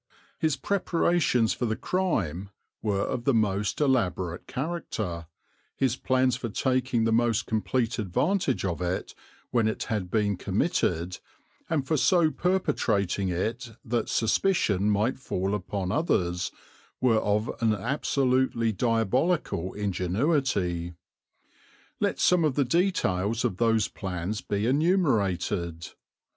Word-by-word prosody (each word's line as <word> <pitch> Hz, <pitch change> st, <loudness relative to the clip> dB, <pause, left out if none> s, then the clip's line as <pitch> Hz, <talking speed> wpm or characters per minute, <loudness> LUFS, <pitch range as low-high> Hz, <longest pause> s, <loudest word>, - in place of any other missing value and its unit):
His 155 Hz, -3 st, +1 dB
preparations 170 Hz, -, +1 dB
for 120 Hz, -, -2 dB
the 110 Hz, -, 0 dB
crime 100 Hz, -, -1 dB, 0.3 s
were 100 Hz, -2 st, 0 dB
of 120 Hz, -, -3 dB
the 140 Hz, -, +3 dB
most 105 Hz, -2 st, 0 dB
elaborate 95 Hz, -, 0 dB
character; 115 Hz, -, -4 dB, 0.5 s
his 130 Hz, -3 st, +1 dB
plans 130 Hz, -1 st, +1 dB
for 120 Hz, -2 st, -4 dB
taking 125 Hz, 0 st, 0 dB
the 115 Hz, -, +2 dB
most 120 Hz, 0 st, +2 dB
complete 115 Hz, +2 st, -1 dB
advantage 130 Hz, -, 0 dB
of 90 Hz, -1 st, -2 dB
it 90 Hz, +1 st, -2 dB, 0.4 s
when 115 Hz, -3 st, +2 dB
it 110 Hz, -, -2 dB
had 95 Hz, -4 st, -2 dB
been 105 Hz, -1 st, +1 dB
committed, 90 Hz, 0 st, -1 dB, 0.5 s
and 150 Hz, -5 st, 0 dB
for 155 Hz, -, +1 dB
so 165 Hz, +2 st, +4 dB
perpetrating 110 Hz, -, 0 dB
it 115 Hz, +7 st, -3 dB
that 115 Hz, -1 st, -1 dB
suspicion 110 Hz, -, +2 dB
might 105 Hz, +6 st, +1 dB
fall 95 Hz, -5 st, -2 dB
upon 95 Hz, -1 st, -3 dB
others, 90 Hz, -, 0 dB, 0.5 s
were 115 Hz, -4 st, +3 dB
of 105 Hz, +1 st, 0 dB
an 115 Hz, -1 st, +3 dB
absolutely 130 Hz, 0 st, +1 dB
diabolical 115 Hz, -, 0 dB
ingenuity. 95 Hz, -, 0 dB, 1.0 s
Let -, -, 0 dB
some 180 Hz, -2 st, +4 dB
of 150 Hz, -4 st, +1 dB
the 140 Hz, -, +2 dB
details 120 Hz, -, +1 dB
of 100 Hz, -7 st, -1 dB
those 115 Hz, -2 st, +2 dB
plans 95 Hz, +2 st, -4 dB
be 100 Hz, +1 st, -2 dB
enumerated. 105 Hz, -, +1 dB
115 Hz, 120 wpm, -27 LUFS, 95-135 Hz, 1.0 s, so